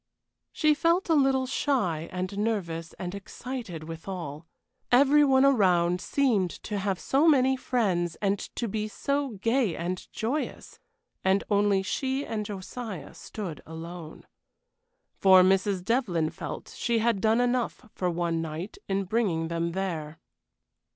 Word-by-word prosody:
She 305 -1 +3
felt 335 +4 +1
a - - +5
little 270 -3 +3
shy 240 - 0
and 185 +1 -3
nervous 170 -7 -2
and 180 0 -6
excited 200 -3 -6
withal. 165 -1 -7 0.4
Every 280 +4 +6
one 265 -1 +5
around 180 -8 +3
seemed 230 -10 +2
to 205 -1 -3
have 190 -2 -1
so 285 +5 +2
many 265 -4 +5
friends, 190 -10 0
and 200 -1 0 0.2
to 235 - -2
be 215 +1 -2
so 280 +1 -2
gay 230 -6 +2
and 175 +2 -4
joyous, 260 +8 -3 0.4
and 190 +1 +3
only 200 -1 +3
she 265 +6 -1
and 210 -2 -3
Josiah 200 - -6
stood 185 -8 -7
alone. 160 0 -8 0.9
For 190 -1 +7
Mrs. 190 0 +2
Devlyn 185 -10 +1
felt - - -7
she 235 -1 0
had 225 -3 +1
done 220 +2 +3
enough 245 -2 0
for 180 - -1
one 170 -1 -1
night 165 +5 -6
in 195 0 0
bringing 185 -6 0
them 170 0 -1
there. 165 -5 -3
200 Hz, 135 wpm, -27 LUFS, 175-245 Hz, 0.9 s, For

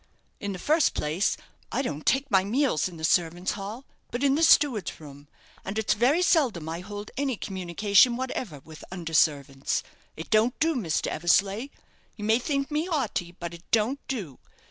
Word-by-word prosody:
In 200 - -3
the 190 - -5
first 305 - +2
place, 155 +6 0 0.3
I 270 - 0
don't 150 - -5
take 270 0 +2
my 190 -1 +5
meals 235 - +1
in 175 -2 -10
the 160 - -10
servants' 175 +2 +1
hall, 210 +6 -6 0.2
but 245 +3 -3
in 275 -1 +4
the 300 - +1
steward's 280 - +4
room; 145 -2 -12 0.4
and 195 +3 -5
it's 220 - +2
very 265 - +3
seldom 255 - +2
I 165 +1 -4
hold 205 +2 -8
any 270 -4 -1
communication 200 +6 +2
whatever 245 - -4
with 155 +2 -13
under 170 -3 -6
servants. 140 -3 +1 0.3
It 160 - -8
don't 225 +3 +3
do, 325 +1 +2
Mr. 180 -11 -1
Eversleigh 195 - +1 0.5
you 210 - -8
may 220 +2 +4
think 275 +2 -2
me 310 +4 -1
'aughty; 225 - -2
but 170 -1 -5
it 170 0 -11
don't 230 +5 +1
do. 195 - -5
205 Hz, 180 wpm, -27 LUFS, 170-260 Hz, 0.5 s, my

